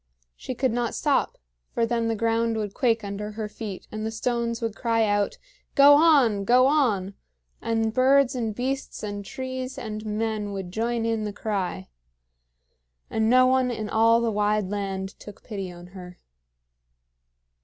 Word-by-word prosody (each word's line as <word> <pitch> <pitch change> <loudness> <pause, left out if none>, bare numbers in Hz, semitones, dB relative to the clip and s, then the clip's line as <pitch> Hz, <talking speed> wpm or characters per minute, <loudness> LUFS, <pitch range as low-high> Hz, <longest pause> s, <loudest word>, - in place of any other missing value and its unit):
She 255 - -6
could 260 0 +1
not 240 0 -1
stop, 290 -3 0 0.4
for 230 - +2
then 230 0 -1
the 225 - 0
ground 230 +1 0
would 210 -2 -3
quake 230 -3 +1
under 205 +1 -5
her 215 0 -4
feet, 210 -2 -8
and 215 0 -5
the 220 - -1
stones 235 +1 -2
would 225 -3 -3
cry 230 -2 +1
out, 205 -1 0 0.4
"Go 280 0 +8
on! 285 -10 +4
go 250 +5 +5
on!" 230 -10 +1 0.5
and 225 -1 0
birds 265 +1 +4
and 225 -4 -3
beasts 265 +1 -3
and 205 -1 -4
trees 260 +4 -5
and 215 -4 -5
men 215 -1 -2
would 190 -2 -5
join 230 +3 -1
in 225 -1 0
the 210 - -3
cry; 195 - -3 1.2
and 220 0 +1
no 255 +1 +6
one 260 0 +3
in 220 -3 -4
all 230 +1 +4
the 230 -1 0
wide 210 -1 0
land 195 -2 -3
took 210 - -12
pity 195 -5 -5
on 175 0 -12
her. 180 -2 -10
225 Hz, 165 wpm, -25 LUFS, 205-245 Hz, 1.2 s, Go